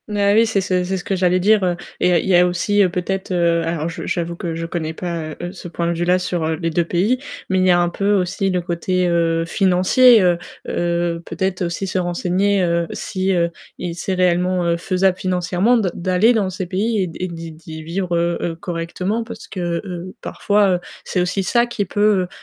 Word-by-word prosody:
Mais 205 Hz, -1 st, +2 dB
oui, 225 Hz, +2 st, +5 dB
c'est 210 Hz, -3 st, +1 dB
ce 185 Hz, -1 st, 0 dB
c'est 190 Hz, +1 st, -2 dB
ce 180 Hz, -, -6 dB
que 195 Hz, -, -1 dB
j'allais 180 Hz, 0 st, +2 dB
dire, 210 Hz, +2 st, +4 dB
heu 180 Hz, -1 st, +1 dB, 0.2 s
et -, -, +3 dB
il -, -, +4 dB
y -, -, +3 dB
a -, -, +5 dB
il -, -, -4 dB
y 190 Hz, -, +4 dB
a 180 Hz, 0 st, +6 dB
aussi, 205 Hz, +4 st, +1 dB
heu, 190 Hz, -, +4 dB
peut-être, 190 Hz, +2 st, -3 dB
heu 170 Hz, -2 st, +2 dB
alors 165 Hz, -1 st, -2 dB
je 165 Hz, -, -6 dB
j'avoue 170 Hz, -1 st, -2 dB
que 170 Hz, -2 st, -4 dB
je 165 Hz, 0 st, -4 dB
connais 165 Hz, -1 st, -3 dB
pas, 165 Hz, -3 st, -4 dB
heu, 175 Hz, 0 st, -4 dB
ce 185 Hz, -2 st, -9 dB
point 170 Hz, 0 st, -3 dB
de 170 Hz, -, +1 dB
vue-là 175 Hz, +2 st, +2 dB
sur 180 Hz, -3 st, -2 dB
les 165 Hz, 0 st, -2 dB
2 170 Hz, +2 st, +2 dB
pays, 195 Hz, +10 st, +1 dB, 0.3 s
mais 190 Hz, 0 st, +2 dB
il 185 Hz, -, +3 dB
y -, -, +4 dB
a 175 Hz, -, +4 dB
un 175 Hz, 0 st, +2 dB
peu 200 Hz, +4 st, 0 dB
aussi 195 Hz, 0 st, 0 dB
le 180 Hz, -1 st, 0 dB
côté, 180 Hz, +1 st, -1 dB
heu, 165 Hz, -1 st, +1 dB
financier, 195 Hz, +7 st, +5 dB
heu, 175 Hz, -1 st, +3 dB, 0.3 s
heu, 170 Hz, -1 st, -1 dB
peut-être 185 Hz, +3 st, -3 dB
aussi 170 Hz, +3 st, -2 dB
se 185 Hz, 0 st, -1 dB
renseigner, 185 Hz, +3 st, +1 dB
heu, 170 Hz, -1 st, +1 dB
si, 190 Hz, 0 st, -2 dB
heu 170 Hz, -2 st, +1 dB, 0.3 s
et 175 Hz, -, -4 dB
c'est 185 Hz, +2 st, -3 dB
réellement, 180 Hz, 0 st, +1 dB
heu, 170 Hz, 0 st, +1 dB
faisable 185 Hz, +1 st, +1 dB
financièrement 185 Hz, +5 st, +1 dB
de 205 Hz, -5 st, +1 dB
d'aller 185 Hz, +6 st, +3 dB
dans 205 Hz, -5 st, +1 dB
ces 185 Hz, 0 st, -4 dB
pays 205 Hz, +4 st, 0 dB
et -, -, -2 dB
d 165 Hz, -, -9 dB
et 185 Hz, -, -1 dB
d'y 165 Hz, -1 st, -7 dB
d'y 160 Hz, 0 st, -10 dB
vivre, 175 Hz, +2 st, -2 dB
heu, 170 Hz, 0 st, 0 dB
heu, -, -, -1 dB
heu, -, -, -10 dB
correctement 180 Hz, +6 st, -3 dB
parce 230 Hz, -, -9 dB
que, 175 Hz, -3 st, -3 dB
heu, 180 Hz, -1 st, -7 dB
parfois, 205 Hz, -1 st, +1 dB
heu, -, -, -9 dB, 0.2 s
c'est 180 Hz, -, -1 dB
aussi 180 Hz, +2 st, -1 dB
ça 235 Hz, +6 st, +2 dB
qui 235 Hz, -4 st, -2 dB
peut, 205 Hz, -1 st, +2 dB
180 Hz, 235 wpm, -20 LUFS, 170-195 Hz, 0.3 s, a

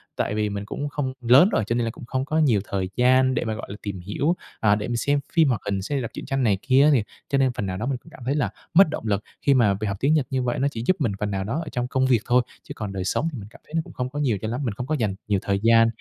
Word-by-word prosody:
tại 105 Hz, -, -1 dB
vì 105 Hz, -1 st, 0 dB
mình 100 Hz, 0 st, -4 dB
cũng 145 Hz, +7 st, -4 dB
không 135 Hz, -3 st, -3 dB
lớn 130 Hz, -, +6 dB
rồi 110 Hz, -, +1 dB
cho 115 Hz, -, 0 dB
nên 120 Hz, -1 st, +1 dB
là 115 Hz, -, -2 dB
cũng 120 Hz, -, -11 dB
không 130 Hz, +2 st, -2 dB
có 155 Hz, +2 st, -1 dB
nhiều 125 Hz, -10 st, +3 dB
thời 95 Hz, -2 st, -1 dB
gian 130 Hz, +1 st, +4 dB
để -, -, -1 dB
mà, 110 Hz, -, -1 dB
gọi 110 Hz, -, -7 dB
là, 100 Hz, -, -6 dB
tìm 100 Hz, -3 st, -5 dB
hiểu, 120 Hz, -, -1 dB, 0.2 s
à, 105 Hz, -2 st, +4 dB
để 105 Hz, 0 st, -3 dB
mình 120 Hz, -1 st, -1 dB
xem 145 Hz, +4 st, +1 dB
phim 165 Hz, -2 st, +5 dB
hoạt 120 Hz, -5 st, 0 dB
hình 100 Hz, -1 st, -1 dB
xem 125 Hz, +9 st, -3 dB
hay 135 Hz, -, 0 dB
đọc 115 Hz, -, -5 dB
truyện -, -, -7 dB
tranh 135 Hz, -1 st, -1 dB
này 105 Hz, -5 st, +3 dB
kia 130 Hz, +1 st, +4 dB
á 150 Hz, -, +6 dB
thì 120 Hz, -6 st, +3 dB, 0.3 s
cho 140 Hz, -, +2 dB
nên 135 Hz, -1 st, +3 dB
phần 105 Hz, -, -2 dB
nào 95 Hz, -1 st, -3 dB
đó 110 Hz, -, -3 dB
mình 135 Hz, 0 st, -1 dB
cũng 160 Hz, -, -18 dB
cảm 160 Hz, -, -14 dB
thấy 135 Hz, +3 st, 0 dB
là 145 Hz, -, +1 dB, 0.2 s
mất 180 Hz, 0 st, +7 dB
động 155 Hz, -, -4 dB
lực 100 Hz, -1 st, 0 dB, 0.2 s
khi 140 Hz, -, +4 dB
mà 115 Hz, -6 st, +4 dB
việc 105 Hz, +2 st, -3 dB
học 100 Hz, 0 st, -2 dB
tiếng 140 Hz, +3 st, +3 dB
Nhật 150 Hz, -4 st, +2 dB
như 130 Hz, -2 st, -1 dB
vậy 120 Hz, 0 st, -1 dB
nó 135 Hz, -, +2 dB
chỉ 115 Hz, -3 st, -5 dB
giúp 185 Hz, -, +4 dB
mình 135 Hz, -8 st, +1 dB
phần 105 Hz, -1 st, -2 dB
nào 95 Hz, -1 st, -2 dB
đó 115 Hz, +10 st, -2 dB
ở 155 Hz, -, -7 dB
trong 125 Hz, -1 st, -2 dB
công 130 Hz, +1 st, +1 dB
việc 125 Hz, -3 st, +4 dB
thôi, 125 Hz, +1 st, +4 dB, 0.2 s
chứ -, -, -8 dB
còn 105 Hz, -3 st, -5 dB
đời 95 Hz, -1 st, -3 dB
sống 120 Hz, -, 0 dB
thì 135 Hz, -, -6 dB
mình 100 Hz, -, -9 dB
cảm -, -, -17 dB
thấy -, -, -18 dB
nó 165 Hz, -, +2 dB
cũng -, -, -13 dB
không 125 Hz, 0 st, -3 dB
có 145 Hz, +3 st, -5 dB
nhiều 125 Hz, -8 st, +1 dB
cho 110 Hz, -, -3 dB
lắm. 120 Hz, +3 st, -3 dB
Mình 115 Hz, -6 st, -1 dB
không 125 Hz, +5 st, -5 dB
có 155 Hz, -, 0 dB
dành 110 Hz, -8 st, -1 dB
nhiều 100 Hz, -2 st, +2 dB
thời 100 Hz, 0 st, 0 dB
gian 115 Hz, 0 st, +6 dB
120 Hz, 350 wpm, -24 LUFS, 105-140 Hz, 0.3 s, mất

